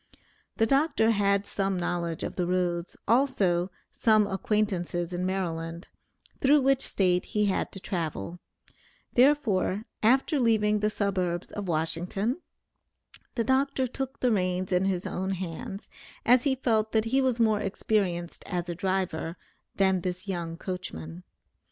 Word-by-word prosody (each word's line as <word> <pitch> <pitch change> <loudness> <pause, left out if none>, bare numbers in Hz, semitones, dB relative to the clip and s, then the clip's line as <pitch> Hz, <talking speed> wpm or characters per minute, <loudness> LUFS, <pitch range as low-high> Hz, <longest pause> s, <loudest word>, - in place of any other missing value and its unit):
The 225 - +4
doctor 275 -3 +3
had 200 -1 +2
some 195 -1 -1
knowledge 175 -2 -2
of - - -4
the 180 -3 -1
roads, 175 -1 -1
also 205 -8 +2 0.2
some 215 -2 +4
acquaintances 190 -4 -1
in 180 +1 -1
Maryland, 170 -3 -3 0.5
through 285 +2 +5
which 270 0 +3
State 180 -6 +1
he 210 -1 0
had 195 - 0
to 195 - -5
travel; 170 - -4 0.7
therefore, 240 -7 +3 0.2
after 265 +6 +3
leaving 215 -3 +3
the 210 +1 +1
suburbs 185 -4 -1
of 205 -2 -5
Washington, 175 - -1 0.9
the 230 - +1
doctor 265 +2 +1
took 265 +2 -5
the 250 - +3
reins 185 -2 0
in 180 +1 +2
his 185 -2 -1
own 190 +1 -2
hands, 185 +2 -6 0.4
as 245 +2 +5
he 270 -2 +3
felt 220 -4 +1
that 220 0 +3
he 265 +4 +2
was 255 -3 +1
more 220 -2 +3
experienced 190 -4 -1
as 180 -2 -2
a 175 - -2
driver 180 -2 -2 0.4
than 190 -2 +3
his 180 +2 -4
young 170 -3 -3
coachman. 90 - -6
195 Hz, 140 wpm, -28 LUFS, 175-225 Hz, 0.9 s, through